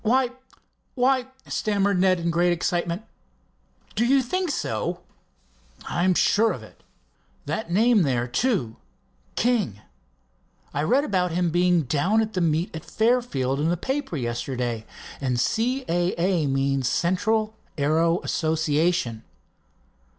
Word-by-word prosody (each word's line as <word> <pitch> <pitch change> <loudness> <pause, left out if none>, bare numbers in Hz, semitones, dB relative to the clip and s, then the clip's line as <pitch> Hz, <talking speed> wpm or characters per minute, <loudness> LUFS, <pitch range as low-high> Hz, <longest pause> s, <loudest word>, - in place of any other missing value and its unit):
"Why—why—" 255 +1 -1 0.2
stammered 200 -2 0
Ned 185 -1 +3
in 170 0 -1
great 175 +1 +2
excitement. 175 +2 -1 0.9
"Do 220 - +1
you 265 +2 +4
think 365 +8 -1
so?" - - -2 0.9
"I 175 - -1
am 185 0 +3
sure 220 +5 +3
of - - -8
it. - - -16 0.6
That 220 - -3
name 220 +4 +4
there, 125 -6 +1
too—'King'. 120 - -2 0.9
I 145 - -1
read 255 - +3
about 180 - 0
him 175 -1 +1
being 175 -1 +3
down 155 - +1
at 220 0 -6
the 185 - -1
meet 165 +1 0
at 160 - -6
Fairfield 220 - 0
in 160 +3 +1
a 175 - 0
paper 265 - -3
yesterday, 120 -2 -3 0.3
and 125 -3 0
'C. 250 - 0
A. 175 +1 +1
A.' 175 -4 +1
means 135 -1 +1
Central 215 - +1 0.2
Aero 165 +4 +2
Association." 160 -6 0
175 Hz, 125 wpm, -24 LUFS, 145-220 Hz, 0.9 s, you